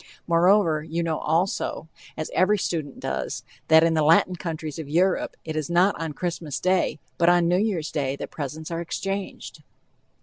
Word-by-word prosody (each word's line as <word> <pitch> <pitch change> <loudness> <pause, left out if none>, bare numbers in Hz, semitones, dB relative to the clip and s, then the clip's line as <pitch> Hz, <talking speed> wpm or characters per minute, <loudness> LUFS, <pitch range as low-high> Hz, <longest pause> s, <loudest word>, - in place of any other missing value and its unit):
Moreover, 170 -1 +4
you 160 +2 -3
know 160 -2 -1
also, 165 -1 -1 0.3
as 155 - -4
every 200 +3 +3
student 160 -7 -3
does, 65 0 -3 0.2
that 160 0 +7
in 165 0 +3
the 160 - +2
Latin 165 +4 +4
countries 160 -3 -5
of 150 -3 -6
Europe 180 +4 +1
it 155 -1 -4
is 155 0 -2
not 180 +4 +4
on 160 -2 -3
Christmas 165 -3 -4
day, 185 -4 +1 0.2
but 170 - +5
on 175 -1 +4
New 180 +2 +3
Year's 190 -7 -1
day, 135 -2 -1
that - - -7
presents 155 +2 -6
are 165 0 -2
exchanged. 195 +3 -5
165 Hz, 175 wpm, -25 LUFS, 155-180 Hz, 0.3 s, that